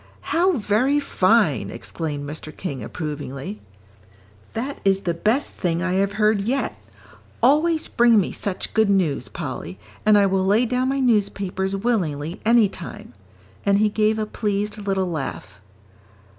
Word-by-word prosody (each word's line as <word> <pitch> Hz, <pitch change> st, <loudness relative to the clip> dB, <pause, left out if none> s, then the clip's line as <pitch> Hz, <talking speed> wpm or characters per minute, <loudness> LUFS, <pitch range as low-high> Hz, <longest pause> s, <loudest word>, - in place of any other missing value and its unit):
"How 365 Hz, +3 st, +3 dB
very 250 Hz, +3 st, +2 dB
fine!" 290 Hz, -, +2 dB
exclaimed 145 Hz, -3 st, -5 dB
Mr. 155 Hz, +1 st, -7 dB
King, 140 Hz, -9 st, -5 dB
approvingly; 140 Hz, -, -6 dB, 0.9 s
"that 255 Hz, +5 st, -4 dB
is 195 Hz, 0 st, +3 dB
the 170 Hz, -, -1 dB
best 220 Hz, -, 0 dB
thing 170 Hz, -1 st, -1 dB
I 185 Hz, -, 0 dB
have 195 Hz, +1 st, +1 dB
heard 210 Hz, -1 st, +2 dB
yet. 255 Hz, +7 st, -1 dB, 0.7 s
Always 315 Hz, +5 st, +3 dB
bring 235 Hz, -2 st, +4 dB
me 190 Hz, -, -1 dB
such 195 Hz, -2 st, -4 dB
good 220 Hz, -2 st, +3 dB
news, 180 Hz, -8 st, +1 dB
Polly, 90 Hz, +3 st, -6 dB, 0.3 s
and 215 Hz, -1 st, +5 dB
I 200 Hz, -, +5 dB
will 190 Hz, -1 st, +1 dB
lay 210 Hz, +6 st, +3 dB
down 250 Hz, +2 st, 0 dB
my 275 Hz, 0 st, 0 dB
newspapers 200 Hz, -5 st, 0 dB
willingly 180 Hz, -7 st, -1 dB
any 230 Hz, -1 st, +5 dB
time." 185 Hz, -3 st, -9 dB, 0.5 s
And 200 Hz, 0 st, +3 dB
he 215 Hz, +1 st, +3 dB
gave 215 Hz, +1 st, +1 dB
a 215 Hz, -, -1 dB
pleased 210 Hz, -1 st, -2 dB
little 195 Hz, -2 st, 0 dB
laugh. 145 Hz, -, -5 dB
200 Hz, 145 wpm, -22 LUFS, 180-230 Hz, 0.9 s, and